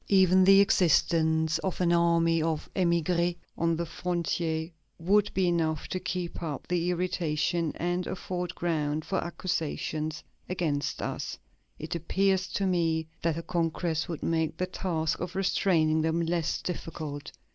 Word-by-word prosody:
Even 185 -1 +5
the 195 +1 +8
existence 160 -4 +3
of 190 - -3
an 175 -1 +3
army 170 -1 +3
of 160 -1 -1
émigrés 170 -1 +2 0.2
on 165 0 +1
the 170 +1 -2
frontier 170 -1 -2 0.3
would 200 +5 +2
be 190 -1 +2
enough 160 -3 0
to 185 - -2
keep 180 -2 -4
up 155 -5 -4
the 175 0 0
irritation 170 -2 0
and 175 +2 -1
afford 180 -1 -4
ground 155 -3 -1
for 190 - -1
accusations 155 -3 -3 0.3
against 155 -6 -1
us; - - -4 0.4
it 155 - -5
appears 190 +3 +1
to 200 - -1
me 165 -3 +1
that 165 -1 0
a 165 - -4
congress 165 -1 -1
would 165 -4 -5
make 160 -1 0
the 185 - 0
task 165 -4 -2
of 180 +1 -5
restraining 170 -5 +2
them 160 +1 +1
less 170 -1 -1
difficult.... 155 -4 -5
170 Hz, 145 wpm, -28 LUFS, 160-180 Hz, 0.4 s, the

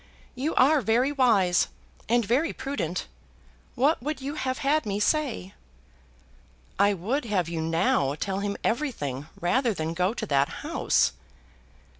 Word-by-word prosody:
You 275 +5 -2
are 285 +3 +5
very 240 +5 +2
wise, 215 -10 +3 0.4
and 235 -1 +3
very 265 +10 +1
prudent. 265 - -3 0.7
What 280 +4 +2
would 295 +2 -3
you 275 +2 -4
have 260 -4 -2
had 295 +2 +1
me 205 -1 -2
say?" 240 - 0 1.3
"I 200 0 +4
would 235 - -2
have 195 -6 0
you 165 -1 -3
now 160 -4 +1
tell 195 +4 -2
him 200 0 -2
everything, 155 - -2
rather 215 +6 +1
than 160 0 -2
go 180 +6 0
to - - -3
that 140 -1 +2 0.2
house." - - +2
220 Hz, 140 wpm, -26 LUFS, 180-270 Hz, 1.3 s, are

